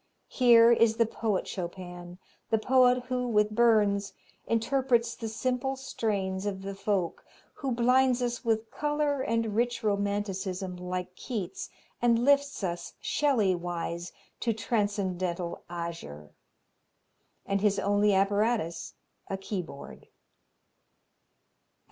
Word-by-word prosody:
Here 235 -2 +6
is 230 -1 +4
the 230 - +4
poet 220 -3 -2
Chopin, 175 -1 -7 0.3
the 225 - +3
poet 250 +2 +4
who, 250 0 -2
with 210 -2 +2
Burns, 205 -4 +3 0.3
interprets 235 0 +1
the 225 - -6
simple 255 +4 -1
strains 205 -7 -2
of 190 -1 -4
the 195 0 -4
folk, 195 -3 -2 0.3
who 275 - -4
blinds 250 +1 +3
us 240 +1 -2
with 225 -1 0
color 295 -2 0
and 230 -3 -1
rich 240 +1 0
romanticism 200 -2 -1
like 180 0 -4
Keats 260 - -5 0.3
and 235 0 +3
lifts 285 -4 +2
us 170 -2 -3
Shelley 250 -11 +2
wise 175 0 -4 0.3
to 230 - 0
transcendental 185 -6 -2
azure. 165 - -7 1.1
And 195 0 0
his 205 -1 +2
only 205 +1 +2
apparatus 200 -2 0 0.3
a 195 - -3
keyboard. 185 -7 -7
210 Hz, 110 wpm, -29 LUFS, 190-240 Hz, 1.1 s, Here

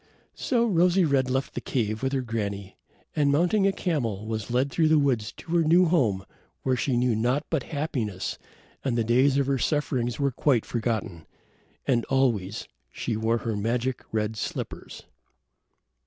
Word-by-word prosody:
So 235 -3 +1
Rosy 180 -2 +3
red 135 -3 +2
left 130 +1 -1
the - - -4
cave 110 -4 -1
with 135 0 0
her 135 - +1
granny, 100 -4 -4 0.4
and 145 -2 +3
mounting 180 +7 +3
a - - +3
camel 120 - -2
was 110 -1 -4
led 130 +3 +1
through 160 +2 +2
the 155 0 +5
woods 130 -7 +1
to 165 - -11
her 170 - +4
new 170 +4 +5
home 120 - +1 0.4
where 130 -1 +2
she 125 +1 0
knew 125 -2 +2
naught 125 +7 0
but 160 -4 +1
happiness 125 - -3 0.4
and 125 -3 0
the 115 - +2
days 130 +5 +3
of 140 - +2
her 135 -1 0
sufferings 130 -4 0
were 140 -1 +1
quite 125 -2 +1
forgotten. 110 -8 -3 0.6
And 120 -3 +2
always 115 -7 0 0.2
she 115 - -3
wore 110 +2 +1
her 115 -2 -1
magic 120 +4 -1
red 110 0 -1
slippers. - - -5
125 Hz, 170 wpm, -26 LUFS, 110-145 Hz, 0.6 s, the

